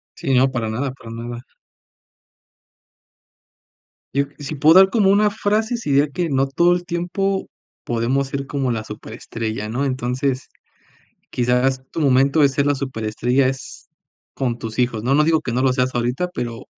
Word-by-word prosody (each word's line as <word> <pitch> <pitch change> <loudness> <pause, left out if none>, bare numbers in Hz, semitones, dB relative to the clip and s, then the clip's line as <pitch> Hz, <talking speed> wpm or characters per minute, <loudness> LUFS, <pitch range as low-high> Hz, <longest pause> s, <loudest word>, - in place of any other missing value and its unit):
Sí, 135 - -2
no, 130 +1 +4
para 115 -4 -2
nada 125 +5 -2
para 125 -3 -13
nada. 120 +1 -7 2.7
Yo, 140 +2 +2
si 145 +2 -5
puedo 155 +4 +5
dar 190 0 +8
como 205 -3 +3
una 205 +2 +4
frase, 220 +3 0
si 225 -11 -4
diría 140 +2 +3
que 175 +1 -2
no 135 -1 +2
todo 170 +6 +3
el 175 0 -2
tiempo 185 +3 -2 0.4
podemos 120 +4 0
ser 140 0 -4
como 135 -1 -2
la 110 -2 -2
súper 105 0 -9
estrella, 110 -2 -5
¿no?, 130 +5 -1
entonces, 130 +1 -2 0.8
quizás 125 +2 +1
tu 165 - -3
momento 140 +2 +3
de 140 - +6
ser 140 +1 0
la 145 - +3
súper 130 -5 -5
estrella 125 +5 +1
es 130 0 -6 0.4
con 125 -3 -2
tus 115 0 -6
hijos, 120 -3 0
no 130 +3 +2
no 150 +2 +4
digo 160 0 +2
que 125 - -4
no 125 +2 0
lo 130 -1 +3
seas 125 0 0
ahorita, 125 +9 -1
pero 120 - -5
135 Hz, 175 wpm, -21 LUFS, 120-150 Hz, 2.7 s, dar